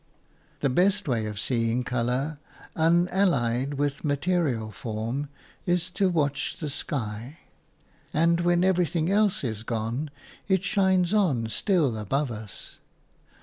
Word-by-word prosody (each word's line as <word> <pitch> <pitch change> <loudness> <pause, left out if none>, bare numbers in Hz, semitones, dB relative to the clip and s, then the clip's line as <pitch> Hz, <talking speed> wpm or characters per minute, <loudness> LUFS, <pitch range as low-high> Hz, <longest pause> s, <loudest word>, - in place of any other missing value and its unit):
The 140 - +2
best 190 +6 +2
way 115 -5 0
of 105 -1 -5
seeing 115 +1 0
colour 125 +5 -1 0.4
unallied 160 -7 +2
with 145 0 -1
material 145 -7 0
form 115 +7 -4 0.4
is 175 +1 +1
to 190 +1 +2
watch 150 -5 0
the 150 -3 -4
sky; 120 +1 -4 0.7
and 170 +2 +3
when 175 0 +3
everything 175 -2 +2
else 205 -4 +2
is 110 -4 -3
gone, 115 +6 -2 0.4
it 190 -2 +2
shines 190 -2 +2
on 145 - +2
still 150 - +1
above 135 +6 -1
us. 110 -2 -8
145 Hz, 120 wpm, -26 LUFS, 120-175 Hz, 0.7 s, and